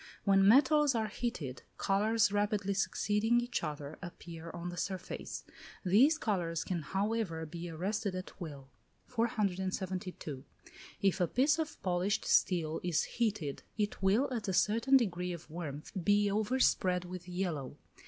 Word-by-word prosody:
When 195 -1 +5
metals 280 +4 +5
are 220 -2 0
heated, 170 - -4 0.2
colours 215 +2 +2
rapidly 205 -1 +1
succeeding 210 +4 +2
each 240 -4 -2
other 150 -1 -5
appear 170 -2 -8
on 175 +1 -5
the 175 - -6
surface: 185 +1 -4 0.4
these 250 - +5
colours 175 - -1
can, 175 -3 -2
however, 190 0 -1
be 170 +2 -6
arrested 190 +4 -2
at 185 +1 -7
will. 140 -5 -8 0.3
472. 190 - -2 0.6
If 195 -1 +2
a 175 - +3
piece 290 - +3
of 315 -1 -3
polished 185 +3 0
steel 165 -4 +2
is 175 -3 +1
heated, 210 - -2 0.2
it 210 -1 -1
will, 205 +8 +3
at 225 -4 -3
a 190 - 0
certain 230 +8 +4
degree 180 -6 -1
of 170 - -9
warmth, 155 -3 -6
be 205 +2 +3
overspread 205 -5 +2
with 180 0 -8
yellow. 175 -7 -3
190 Hz, 140 wpm, -33 LUFS, 175-215 Hz, 0.6 s, When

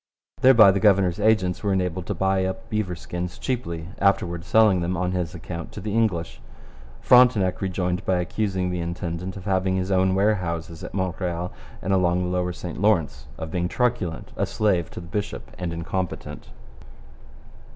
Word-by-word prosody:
Thereby 115 -6 +8
the 100 - 0
governor's 95 -3 +3
agents 105 -4 +2
were 100 - 0
enabled 90 -1 -1
to 105 - -2
buy 95 +1 +1
up 115 +5 -4
beaver 105 -5 -1
skins 90 +1 -5
cheaply, 85 - -3
afterwards 90 -3 +1
selling 110 -5 +4
them 90 +1 -1
on 90 +1 -1
his 90 -1 -2
account 85 0 -7
to - - -6
the 105 +1 -4
English. 100 -7 0 0.6
Frontenac 120 -7 +5
rejoined 90 -1 -1
by 95 - +1
accusing 95 0 -1
the 90 - -2
intendant 85 +2 -4
of 95 - -9
having 95 -1 +1
his 95 +1 -1
own 95 0 +3
warehouses 85 -5 -1
at - - -7
Montreal 90 -2 -2 0.3
and 95 - 0
along 90 -1 +2
the 90 - -2
lower 90 0 0
St 85 0 -7
Lawrence, 80 - +1
of 80 -1 -6
being 90 0 0
truculent, 110 -7 -1
a - - -1
slave 95 -6 +1
to - - -8
the 85 - -11
bishop, 105 +4 -4
and 90 -2 -3
incompetent. 90 +2 -4
90 Hz, 170 wpm, -24 LUFS, 85-100 Hz, 0.6 s, Thereby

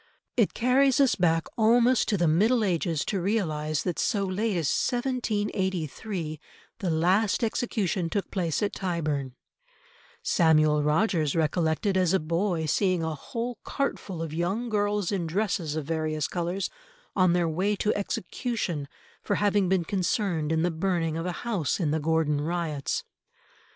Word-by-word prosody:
It 230 -5 +2
carries 260 +2 +3
us 275 -3 +5
back 165 -3 +2
almost 235 +3 +4
to 210 - +2
the 175 -2 +2
Middle 215 +9 +3
Ages 170 -5 0
to 195 -3 -1
realise 155 -7 -1
that 180 -3 -2
so 200 -2 +1
late 195 +1 -1
as 160 -4 0
1783 205 - -1 0.4
the 190 -5 -1
last 185 +8 +2
execution 210 -6 -1
took 200 +3 -2
place 175 -2 -1
at 205 - 0
Tyburn; 155 -8 -2 0.9
Samuel 155 -4 +4
Rogers 155 0 +1
recollected 165 +4 +1
as 185 -1 +2
a 190 - +4
boy 170 +1 -1
seeing 185 +2 +1
a 160 -1 -1
whole 235 - -5
cartful 195 -11 -3
of 155 -2 -5
young 195 +9 -1
girls 205 -2 0
in 180 -5 -1
dresses 175 -3 -1
of 155 -2 -3
various 155 -1 -1
colours 175 +2 -2 0.4
on 185 -3 +4
their 175 -1 +2
way 185 +6 0
to 210 +1 +1
execution 195 - -3 0.3
for - - -1
having 205 -2 +2
been 185 -3 +2
concerned 180 -4 0
in 160 0 +1
the 175 - +1
burning 165 -1 -1
of 165 +2 -3
a - - -1
house 200 - -1
in 160 -5 0
the 160 - +1
Gordon 155 -1 +1
Riots. 160 -3 -2
180 Hz, 150 wpm, -27 LUFS, 160-205 Hz, 0.9 s, us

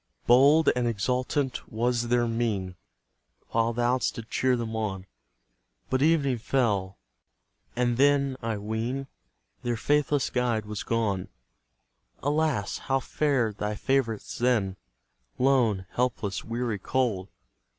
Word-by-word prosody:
Bold 140 +6 +6
and 125 -1 +1
exultant 125 +4 -1
was 120 +1 0
their 120 0 +2
mien, 110 -6 -1 0.7
While 115 0 +1
thou 120 +2 +1
didst - - -2
cheer 130 -1 +2
them 115 -1 -4
on; 100 -4 -3 0.9
But 130 0 +1
evening 140 -5 +3
fell, 105 -7 0 0.8
and 120 -1 +1
then, 140 -1 +3
I 115 -2 -2
ween, 110 +6 -3 0.6
Their 120 -2 -1
faithless 145 +2 +1
guide 120 -4 0
was 105 -1 -5
gone. 105 -5 -1 1.0
Alas! 145 -7 0
how 135 0 0
fared 130 -6 0
thy 105 0 -2
favourites 115 -2 -1
then, 115 -6 +1 0.6
Lone, 120 -8 +2
helpless, 110 -5 -1
weary, 115 -2 -2
cold? 105 -5 -1
120 Hz, 115 wpm, -27 LUFS, 110-130 Hz, 1.0 s, Bold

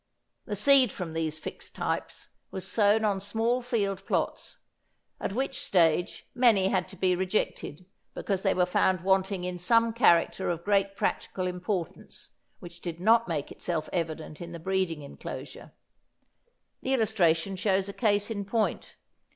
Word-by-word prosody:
The 205 - -3
seed 260 +2 +5
from 170 -3 -6
these 160 -1 -2
fixed 155 - -8
types - - -4 0.2
was 190 0 -6
sown 210 +2 +3
on 200 -2 0
small 225 +5 0
field 205 -6 -1
plots, - - -2 0.6
at - - -3
which 265 +4 -2
stage 175 -2 +2
many 225 -7 +4
had 185 -2 0
to - - -11
be 185 0 +2
rejected 185 -3 -2 0.3
because 195 -2 -2
they 195 -1 +2
were 180 - +3
found 180 0 +2
wanting 190 0 +1
in 180 0 -4
some 230 +5 +3
character 190 -5 +3
of 170 -1 -2
great 200 -1 +2
practical 185 -1 -2
importance 180 -1 -4 0.3
which 175 0 -12
did 170 -2 -5
not 225 +5 +4
make 155 -5 -3
itself 160 -3 -3
evident 160 -2 -4
in 170 0 -7
the 170 - -7
breeding 185 -3 -1
enclosure. 140 - -9 1.1
The 265 +1 +1
illustration 195 -6 +2
shows 190 0 +1
a 200 - -6
case 205 -1 +1
in 205 -2 -3
point. 215 +2 -2
190 Hz, 150 wpm, -28 LUFS, 175-210 Hz, 1.1 s, seed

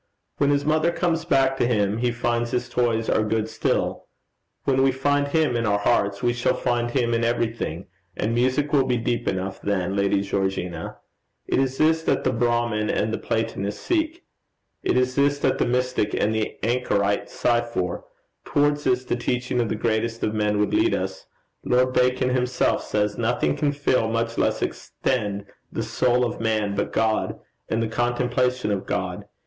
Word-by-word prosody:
When 140 - +3
his 145 0 +1
mother 155 +2 +2
comes 170 -2 0
back 135 -5 +2
to 120 - +2
him 105 -2 +1
he 125 0 +1
finds 120 0 -1
his 125 +1 -2
toys 115 -2 0
are - - +2
good 110 0 0
still. - - -1 0.6
When 135 -1 +2
we 135 0 +4
find 145 +2 +1
Him 150 -4 +1
in 115 -1 0
our 100 - +3
own - - -5
hearts, 100 -2 +1
we 120 0 +2
shall 120 0 +1
find 120 -1 0
him 120 -2 0
in 115 0 +1
everything, 115 -7 -1 0.3
and 110 +2 0
music 130 +5 +1
will 135 -3 +4
be 125 - +1
deep 120 +1 -2
enough 95 +1 -2
then, 95 -1 -1
Lady 100 0 +2
Georgina. 95 -4 -3 0.5
It - - +1
is 135 0 0
this 160 +1 +3
that - - 0
the - - +1
Brahmin 120 -2 0
and 110 +1 0
the - - -2
Platonist 105 -3 -2
seek; 330 0 -1 0.6
it - - +1
is 125 0 +2
this 145 +1 +2
that - - 0
the - - +2
mystic 125 -3 0
and 110 - +1
the 110 -1 -2
anchorite 105 -4 0
sigh 120 -1 +1
for; 95 -7 -3 0.4
towards 145 0 +1
this 125 0 +1
the - - 0
teaching 125 0 -1
of 115 - -1
the - - -1
greatest 115 +1 -1
of 105 - 0
men 105 -1 +1
would 105 - +1
lead 335 +1 +3
us: - - -4 0.4
Lord 125 +1 +2
Bacon 125 0 +2
himself 125 0 +1
says, 105 0 -1
"Nothing 110 -11 +1
can 145 - +1
fill, 140 -5 +1
much 115 +1 -1
less - - +1
extend 105 -6 -2 0.3
the 115 - -2
soul 125 +2 +2
of 120 - -4
man, 110 -2 0
but 100 0 -2
God, 110 -1 0 0.3
and 115 +1 0
the - - 0
contemplation 120 0 0
of 100 -1 -2
God." 95 -3 -3
120 Hz, 185 wpm, -24 LUFS, 105-130 Hz, 0.6 s, we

